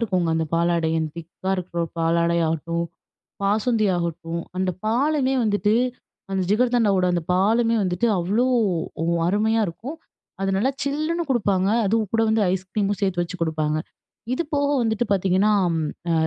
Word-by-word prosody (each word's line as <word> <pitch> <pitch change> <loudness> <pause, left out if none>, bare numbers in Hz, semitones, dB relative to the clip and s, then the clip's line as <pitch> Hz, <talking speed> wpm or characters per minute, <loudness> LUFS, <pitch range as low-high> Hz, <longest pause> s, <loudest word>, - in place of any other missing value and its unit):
இருக்குங்க. 185 -7 0
அந்த 160 - 0
பாலாடை 170 -1 +1
அந்த 160 -1 -2
திக்கா 170 +3 -6
இருக்க 175 -1 -3 0.2
பாலாடை 170 +1 +2
ஆகட்டும், 170 +2 -1 0.6
பாசுந்தி 215 +2 +2
ஆகட்டும், 170 0 -3 0.2
அந்த 185 0 +1 0.2
பாலுமே 270 +3 +1
வந்துட்டு 210 0 +2 0.6
அந்த 190 -1 0
ஜிகர்தண்டாவோட 220 -4 +3
அந்த 175 - 0
பாலுமே 225 +5 +3
வந்துட்டு 185 +4 0
அவ்வளோ 200 +8 +1 0.6
ஒ - - 0 0.2
அருமையா 215 +4 +2
இருக்கும். 240 - -7 0.4
அது 195 - 0
நல்லா 255 +7 +2
சில்லுன்னு 310 +5 -1
குடுப்பாங்க, 200 -6 +2 0.2
அதுவும் 215 -1 0
கூட 225 - +2
வந்து 220 -1 +2
ஐஸ்கிரீமும் 195 +2 -1
சேர்த்து 185 -3 +1
வச்சு 175 +2 -6
கொடுப்பாங்க. 155 -1 0 0.6
இது 340 - -1
போக 285 0 +2
வந்துட்டு 220 0 0
பார்த்தீங்கன்னா, 195 +2 +2 0.6
அ - - +3
195 Hz, 140 wpm, -23 LUFS, 170-225 Hz, 0.6 s, ஜிகர்தண்டாவோட